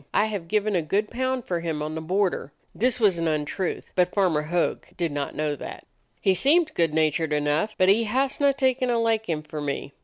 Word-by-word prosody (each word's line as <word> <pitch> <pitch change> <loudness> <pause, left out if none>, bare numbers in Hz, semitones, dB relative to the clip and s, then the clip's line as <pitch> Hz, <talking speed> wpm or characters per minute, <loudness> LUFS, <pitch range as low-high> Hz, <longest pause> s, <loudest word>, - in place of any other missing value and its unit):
I 210 - +4
have 205 -6 -4
given 210 +2 +1
a 175 - +2
good 200 +7 -1
pound 260 0 -1
for 175 -2 -1
him 160 -3 -3
on 155 +1 -4
the 160 - -4
border." 180 -3 0 0.2
(This 250 +2 +1
was 200 -6 +3
an 165 - 0
untruth, 155 +4 -2
but 180 -1 +2
Farmer 180 -7 +2
Hogg 170 +3 -1
did 170 -3 -1
not 145 -1 -3
know 150 -1 -1
that.) - - -8 0.3
"He 190 - +3
seemed 310 - +3
good 165 -2 +1
natured 155 0 +1
enough, 150 +8 0
but 185 - +4
he 215 +4 +4
hasna 275 +4 +1
taken 260 -2 +1
a 240 - +2
liking 220 -9 0
for 155 0 -6
me. 140 -1 -4
185 Hz, 210 wpm, -25 LUFS, 155-225 Hz, 0.3 s, I